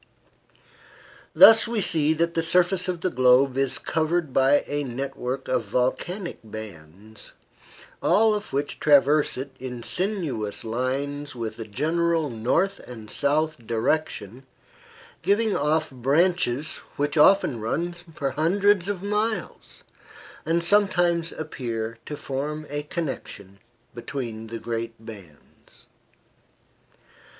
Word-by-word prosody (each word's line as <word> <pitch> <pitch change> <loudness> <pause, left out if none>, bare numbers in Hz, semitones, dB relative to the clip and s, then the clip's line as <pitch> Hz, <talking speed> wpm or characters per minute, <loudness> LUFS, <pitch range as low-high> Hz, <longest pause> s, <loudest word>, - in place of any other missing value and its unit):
Thus 225 +1 +8
we 230 -1 -1
see 160 -5 +3
that 170 +1 0
the 165 - +1
surface 180 +2 +2
of 180 -2 -3
the 185 - 0
globe 130 +1 +4
is 135 -1 0
covered 160 -2 -1
by 135 +2 +4
a 145 0 -2
network 130 0 -4
of 125 -3 0
volcanic 145 - -2
bands, 105 -1 -10 0.7
all 220 +1 +4
of 210 0 -4
which 140 +1 -2
traverse 145 0 +4
it 135 +2 -5
in 125 -2 -6
sinuous 165 - -2
lines 135 +5 -3
with 115 -2 -5
a 115 - -5
general 160 +6 0
north 165 - 0
and 110 -4 -10
south 150 -3 0
direction, 120 -1 -2 0.7
giving 210 +1 +2
off 155 +1 0
branches 145 +2 +1 0.2
which 145 0 -1
often 155 - +4
run 170 +11 -2
for 165 -5 -5
hundreds 190 +5 +2
of 200 -2 -3
miles, 210 -1 -3 0.6
and 170 +1 +1
sometimes 175 -4 +2
appear 115 -7 -5
to 150 - -5
form 150 +3 -4
a 145 0 -2
connection 135 - -6 0.3
between 115 -2 -6
the 115 +1 -6
great 115 0 -4
bands. 100 -10 -14
145 Hz, 115 wpm, -25 LUFS, 120-170 Hz, 0.7 s, Thus